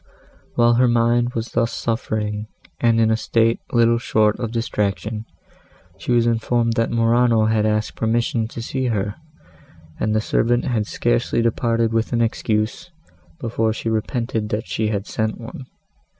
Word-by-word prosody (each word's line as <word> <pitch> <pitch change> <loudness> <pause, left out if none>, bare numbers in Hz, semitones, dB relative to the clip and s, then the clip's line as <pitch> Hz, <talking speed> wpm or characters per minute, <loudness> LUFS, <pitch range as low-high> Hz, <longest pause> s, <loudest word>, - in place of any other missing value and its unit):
While 120 0 +4
her 125 - +5
mind 120 +1 +2
was 115 +1 -3
thus 115 0 +1
suffering 110 -2 -2 0.3
and 115 -1 +3
in 110 -1 +3
a - - +4
state 115 +1 +1
little 115 -1 +3
short 110 -2 +2
of 115 - -2
distraction, 110 -1 -2 0.7
she - - -3
was 120 -1 +4
informed 115 0 +1
that 115 0 +1
Morano 115 -1 +3
asked 110 -1 0
permission 115 0 0
to 115 0 -7
see 130 +1 -2
her, 105 -3 -1 0.9
and 110 0 0
the - - +3
servant 120 +2 +1
had 110 -5 0
scarcely - - 0
departed 115 0 +1
with 115 +2 0
an 115 - +2
excuse, 110 +8 -1 0.5
before 115 -1 0
she 115 - -3
repented 110 -1 -2
that 105 +1 -2
she 90 +6 -1
had 100 -2 -2
sent 110 -1 -2
one. 120 +2 -9
115 Hz, 150 wpm, -21 LUFS, 110-120 Hz, 0.9 s, her